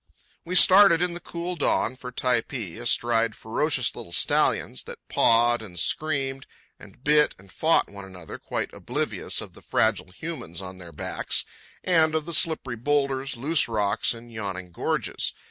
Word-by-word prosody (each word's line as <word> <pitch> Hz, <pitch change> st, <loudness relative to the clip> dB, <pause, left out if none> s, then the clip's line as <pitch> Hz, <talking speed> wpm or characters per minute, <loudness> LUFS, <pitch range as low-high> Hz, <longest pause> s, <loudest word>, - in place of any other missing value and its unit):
We 180 Hz, +2 st, -3 dB
started 185 Hz, -1 st, +7 dB
in 180 Hz, -1 st, 0 dB
the 175 Hz, -, -5 dB
cool 175 Hz, +1 st, -5 dB
dawn 130 Hz, -6 st, +1 dB
for 125 Hz, -1 st, -8 dB
Typee, 120 Hz, -6 st, -2 dB
astride 115 Hz, -2 st, +1 dB
ferocious 130 Hz, +3 st, -1 dB
little 85 Hz, -, -9 dB
stallions 65 Hz, -, +2 dB
that -, -, -11 dB
pawed 120 Hz, +1 st, +3 dB
and 90 Hz, -5 st, -10 dB
screamed 135 Hz, -, -1 dB, 0.3 s
and 125 Hz, -, -15 dB
bit 150 Hz, +1 st, +4 dB
and 95 Hz, 0 st, -18 dB
fought 160 Hz, +1 st, +2 dB
one 100 Hz, 0 st, -11 dB
another 90 Hz, -4 st, -10 dB
quite -, -, -4 dB
oblivious -, -, -1 dB
of -, -, -9 dB
the -, -, -14 dB
fragile -, -, +1 dB
humans 115 Hz, -, -6 dB
on 95 Hz, -1 st, -8 dB
their 85 Hz, -2 st, -10 dB
backs 75 Hz, -, -2 dB, 0.4 s
and 160 Hz, -3 st, +3 dB
of 155 Hz, -1 st, -1 dB
the 170 Hz, -, -5 dB
slippery 155 Hz, -6 st, +1 dB
boulders, 135 Hz, 0 st, 0 dB
loose 150 Hz, +5 st, +1 dB
rocks, 105 Hz, -3 st, 0 dB
and 120 Hz, 0 st, -9 dB
yawning 95 Hz, -4 st, -5 dB
gorges. -, -, -2 dB
125 Hz, 160 wpm, -25 LUFS, 100-155 Hz, 0.4 s, started